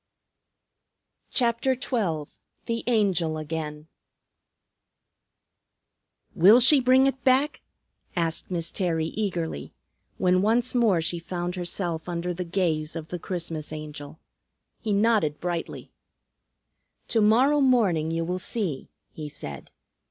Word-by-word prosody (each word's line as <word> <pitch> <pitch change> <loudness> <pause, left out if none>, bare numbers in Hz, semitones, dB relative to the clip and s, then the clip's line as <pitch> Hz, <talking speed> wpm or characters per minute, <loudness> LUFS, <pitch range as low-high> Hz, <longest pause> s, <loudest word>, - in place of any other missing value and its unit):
CHAPTER 240 +1 +1
XII 180 - -2 0.3
THE 230 0 -2
ANGEL 190 -9 +1
AGAIN 155 -1 -5 2.5
"Will 205 +8 +7
she 265 +4 +7
bring 260 +1 +5
it 270 -2 -1
back?" 265 +4 +2 0.5
asked 165 -2 -1
Miss 170 -2 -2
Terry 165 -4 -1
eagerly, 175 - -3 0.4
when 185 0 +3
once 230 +4 +2
more 225 -9 +3
she 170 +2 -1
found 175 +1 -4
herself 175 -2 -3
under 175 +1 -2
the 180 +1 -4
gaze 165 -4 -1
of 160 -1 -6
the 180 - -4
Christmas 165 -4 -4
Angel. 150 0 -8 0.6
He 220 - -3
nodded 205 -7 +2
brightly. 175 -2 -4 1.2
"To 225 - +2
morrow 255 +8 +4
morning 205 - +3
you 165 0 -1
will 180 +2 -2
see," 185 - -3 0.2
he 150 -1 -6
said. 75 - -7
180 Hz, 115 wpm, -26 LUFS, 160-230 Hz, 2.5 s, Will